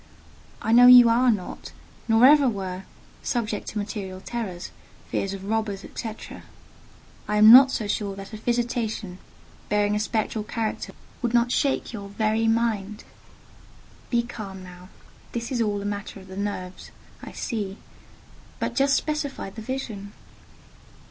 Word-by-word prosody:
I 220 - 0
know 245 +2 +8
that 250 - +11
you 245 -2 +9
are 245 +2 +4
not, 205 -6 -3 0.3
nor 225 +1 +5
ever 285 -1 +6
were, 190 -3 -5 0.4
subject 225 -4 -2
to - - -5
material 200 -2 -5
terrors, 190 -4 -5 0.4
fears 195 - -1
of 190 - -9
robbers, 210 -2 -2
&c.—I 215 -1 -9
am 215 +1 +9
not 265 +1 +10
so 225 - -2
sure 205 -1 -2
that 195 +2 -10
a - - -5
visitation, 230 -4 -2 0.5
bearing 210 0 +2
a - - 0
spectral 215 0 -1
character, 220 0 -4 0.3
would 240 -1 0
not 240 0 +3
shake 275 -2 0
your 200 -3 -7
very 220 +2 0
mind. 225 -2 0 1.1
Be 235 -1 +2
calm 195 -5 -8
now. 180 0 -13 0.4
This 235 +1 -4
is 245 -3 0
all 205 -2 0
a - - -6
matter 205 0 -5
of 190 0 -15
the 190 - -9
nerves, 190 -2 -5 0.3
I - - -9
see: 205 -5 -4 0.8
but - - -2
just 275 0 +3
specify 290 -9 -3
the 220 - -9
vision." 220 -5 -5
215 Hz, 150 wpm, -25 LUFS, 200-235 Hz, 1.1 s, that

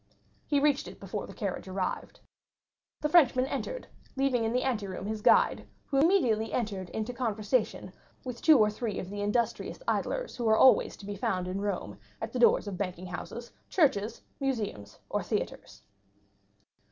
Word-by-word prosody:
He 290 - +3
reached 290 -1 +2
it - - -10
before - - -5
the - - -10
carriage 195 -3 -4
arrived. 185 -1 -4 0.8
The 300 - +2
Frenchman 265 -6 +5
entered, - - -4 0.3
leaving 265 -3 +1
in 225 - 0
the 250 +1 +1
anteroom 200 -7 -2
his 215 0 -3
guide, - - +4 0.2
who 275 - +1
immediately 250 - +3
entered 200 -6 -2
into 220 +5 -3
conversation 225 -1 -1 0.3
with 250 -2 -6
two 315 -3 +7
or 210 -2 +4
three 215 -1 -3
of 185 - -5
the 205 0 -4
industrious 220 +3 -1
idlers - - -1
who 235 -3 0
are 220 - +5
always 260 - +5
to 200 - -11
be 205 0 -5
found 185 -2 -1
in 190 +2 -3
Rome 180 - -3 0.2
at 225 0 -5
the 250 - -2
doors 235 - +5
of 190 -3 -5
banking 185 -2 -3
houses, 205 +6 -7 0.2
churches, 235 - +1 0.2
museums, 215 - -3
or - - -1
theatres. - - -4
220 Hz, 165 wpm, -29 LUFS, 200-255 Hz, 0.8 s, two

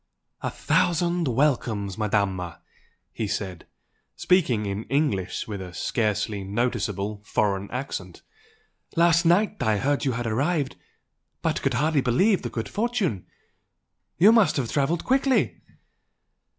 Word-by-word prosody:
"A - - -1
thousand 175 -1 +1
welcomes, 115 -7 0
Madama!" 100 -5 -1 0.5
he 110 - -3
said, 95 -4 -4 0.5
speaking 135 - +2
in 100 +2 -3
English 135 -11 -1
with 100 -3 -5
a 90 -2 -8
scarcely 105 0 -1
noticeable 105 -1 -2
foreign 100 -1 0
accent 105 -8 -6 0.7
"Last 170 0 +4
night 205 +5 +2
I 110 -1 +2
heard 140 +6 0
you 135 -3 +1
had 120 +1 -3
arrived, 140 +6 0 0.7
but - - 0
could 135 -2 0
hardly 150 +2 +2
believe 185 - +3
the 120 - -4
good 115 -1 -4
fortune! 210 - -1 0.9
You 195 +7 +7
must 215 -10 +4
have 125 -5 -2
travelled 150 +4 0
quickly?" 265 0 +2
125 Hz, 125 wpm, -25 LUFS, 105-165 Hz, 0.9 s, You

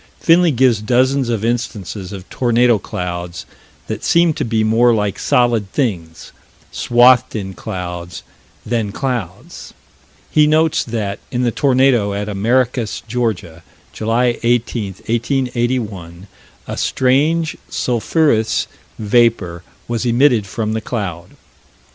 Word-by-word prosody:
Finley 170 +1 +4
gives 125 -5 +2
dozens 130 +3 +1
of 115 -2 -1
instances 110 -5 -3
of 95 -2 -9
tornado 120 -2 +2
clouds 90 -2 -5 0.4
that - - -5
seem 170 -1 +3
to - - -3
me 110 -1 0
more 115 +2 +3
like 105 -2 -2
solid 120 -7 +1
things 85 - -3 0.4
swathed 120 +1 +4
in 95 -3 -4
clouds, 90 -1 -6 0.4
than 110 -3 -1
clouds. 120 -7 -5 0.6
He 150 -1 +4
notes 160 +1 +2
that, 110 -4 -3
in 125 0 -1
the 120 - +1
tornado 125 -6 +2
at 105 +1 -3
Americus, 115 +3 0
Georgia, 105 -8 -3 0.3
July 120 +2 0
18, 115 -4 0
1881, 120 -7 -2 0.4
"a - - -6
strange 155 +6 +1
sulphurous 120 -1 +1 0.3
vapor 105 -6 +1 0.3
was 120 0 -2
emitted 120 -3 +3
from 110 +2 -3
the 110 - -2
cloud." 90 -7 -5
115 Hz, 115 wpm, -17 LUFS, 100-125 Hz, 0.6 s, Finley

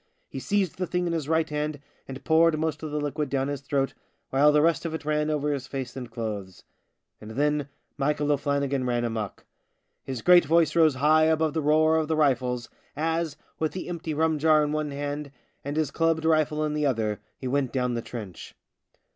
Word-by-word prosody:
He 135 - -6
seized 195 +3 -1
the 185 - -1
thing 180 +1 -1
in 170 - -1
his 155 -3 -3
right 160 0 +2
hand 150 0 -3 0.3
and 135 0 -8
poured 160 0 +4
most 155 -1 -2
of 155 - -4
the 150 0 -2
liquid 145 0 -2
down 135 0 0
his 145 -2 -4
throat, 135 -1 -1 0.4
while 145 +3 +5
the 150 0 +4
rest 165 0 +2
of 165 -1 -3
it 160 - -7
ran 150 0 0
over 150 -1 0
his 135 -2 -5
face 130 -3 -5
and 125 -3 -6
clothes. 105 -5 -6 0.6
And 105 - -9
then 145 +3 0 0.3
Michael 145 +1 +1
O'Flannigan 140 -2 0
ran 120 -1 0
amok. 110 -4 -4 0.6
His 130 -3 -5
great 180 -1 +7
voice 165 +2 +3
rose 160 -4 +5
high 155 +4 +4
above 160 -1 +2
the 160 - 0
roar 155 +2 +4
of 160 -1 0
the 160 - 0
rifles, 125 -4 +1 0.3
as, 160 0 -1 0.2
with 155 -1 -1
the 185 - -5
empty 165 -3 -4
rum 160 0 +1
jar 155 0 +4
in 150 - -1
one 155 -1 -1
hand 145 0 -4 0.3
and 145 +2 -4
his 155 -3 0
clubbed 165 0 +1
rifle 155 -1 +2
in 150 - -2
the 150 -1 +1
other 110 -5 -1 0.2
he 130 - -5
went 135 -1 0
down 125 -2 0
the 120 - -2
trench. 105 -7 -8
150 Hz, 205 wpm, -26 LUFS, 135-160 Hz, 0.6 s, great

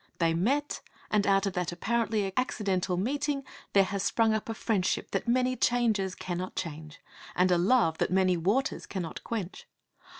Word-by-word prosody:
They 165 -1 +2
met; 270 - 0 0.3
and 210 -1 +2
out 195 0 +3
of 195 - -1
that 180 -1 -1
apparently 215 +1 0
accidental 195 -7 0
meeting 280 +7 -1 0.3
there 195 - +6
has 200 0 -3
sprung 225 +2 +2
up 220 +1 -2
a 225 - -2
friendship 205 -5 -1
that 195 - -2
many 255 +1 +2
changes 220 -7 +1
cannot 180 0 -4
change, 155 -1 -6 0.4
and 180 +1 +3
a 175 - +5
love 180 -4 +3
that - - +1
many 185 -1 +3
waters 205 - 0
cannot 175 -5 -5
quench. 205 -6 -5
195 Hz, 165 wpm, -29 LUFS, 180-235 Hz, 0.4 s, there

